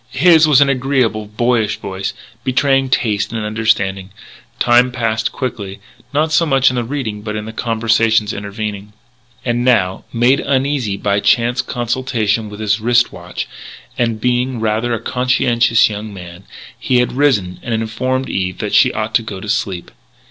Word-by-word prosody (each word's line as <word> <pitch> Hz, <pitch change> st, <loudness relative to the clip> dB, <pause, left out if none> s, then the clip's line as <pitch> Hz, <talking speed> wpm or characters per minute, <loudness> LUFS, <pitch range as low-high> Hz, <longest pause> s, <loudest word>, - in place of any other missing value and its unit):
His 160 Hz, +2 st, +5 dB
was 145 Hz, -2 st, +5 dB
an 140 Hz, -, +5 dB
agreeable, 130 Hz, -5 st, 0 dB
boyish 110 Hz, 0 st, 0 dB
voice, 95 Hz, 0 st, -5 dB, 0.3 s
betraying 135 Hz, 0 st, +2 dB
taste 105 Hz, -5 st, 0 dB
and 110 Hz, -2 st, -3 dB
understanding. 105 Hz, -3 st, 0 dB, 0.5 s
Time 125 Hz, +1 st, +4 dB
passed 115 Hz, -3 st, -1 dB
quickly 105 Hz, -7 st, -5 dB, 0.3 s
not 155 Hz, +2 st, +1 dB
so 160 Hz, +2 st, +3 dB
much 135 Hz, -4 st, +3 dB
in -, -, -4 dB
the 120 Hz, -, 0 dB
reading 115 Hz, -5 st, -4 dB
but 105 Hz, 0 st, -5 dB
in 105 Hz, 0 st, -4 dB
the 110 Hz, -, -8 dB
conversations 115 Hz, -1 st, +1 dB
intervening. 100 Hz, 0 st, -6 dB, 0.5 s
And 120 Hz, 0 st, 0 dB
now, 100 Hz, -7 st, +2 dB
made 120 Hz, +3 st, +3 dB
uneasy 135 Hz, -6 st, 0 dB
by 100 Hz, 0 st, 0 dB
chance 120 Hz, +4 st, +2 dB
consultation 120 Hz, -4 st, -1 dB
with 105 Hz, 0 st, -10 dB
his 105 Hz, 0 st, 0 dB
wrist 120 Hz, +1 st, +2 dB
watch, -, -, -6 dB, 0.5 s
and 115 Hz, -2 st, -1 dB
being 125 Hz, +1 st, 0 dB
rather 110 Hz, +2 st, 0 dB
a -, -, -4 dB
conscientious 120 Hz, -2 st, +2 dB
young 105 Hz, 0 st, -6 dB
man, 90 Hz, -1 st, -11 dB, 0.3 s
he 125 Hz, -, +1 dB
had 125 Hz, 0 st, +1 dB
risen 120 Hz, -10 st, +1 dB
and 120 Hz, -, -6 dB
had 110 Hz, 0 st, 0 dB
informed 130 Hz, +4 st, -2 dB
Eve 90 Hz, -1 st, -2 dB
that -, -, -4 dB
she -, -, +5 dB
ought 110 Hz, 0 st, -3 dB
to -, -, +3 dB
go 105 Hz, -4 st, -7 dB
to 105 Hz, -, -8 dB
sleep. 95 Hz, -5 st, -2 dB
115 Hz, 165 wpm, -17 LUFS, 105-125 Hz, 0.5 s, His